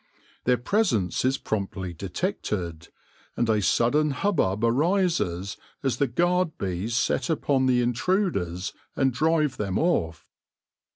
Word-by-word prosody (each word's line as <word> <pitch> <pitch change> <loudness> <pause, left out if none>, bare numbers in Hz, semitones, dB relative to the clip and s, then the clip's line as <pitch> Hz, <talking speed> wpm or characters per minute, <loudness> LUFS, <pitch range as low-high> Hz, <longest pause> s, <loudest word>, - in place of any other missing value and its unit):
Their 125 0 +4
presence 120 - +1
is 130 +2 +2
promptly 95 -5 -3
detected, 85 0 -3 0.5
and 120 - +1
a 110 -2 +2
sudden 145 +10 +2
hubbub 135 - 0
arises 130 - +1 0.3
as 130 -4 0
the 140 - +2
guard 175 +6 +1
bees 95 +5 -2
set - - 0
upon 140 -4 +1
the 125 -1 +3
intruders 120 - 0 0.2
and 135 -2 +2
drive 155 0 +1
them 95 -3 -1
off. 85 - 0
120 Hz, 120 wpm, -26 LUFS, 95-155 Hz, 0.5 s, Their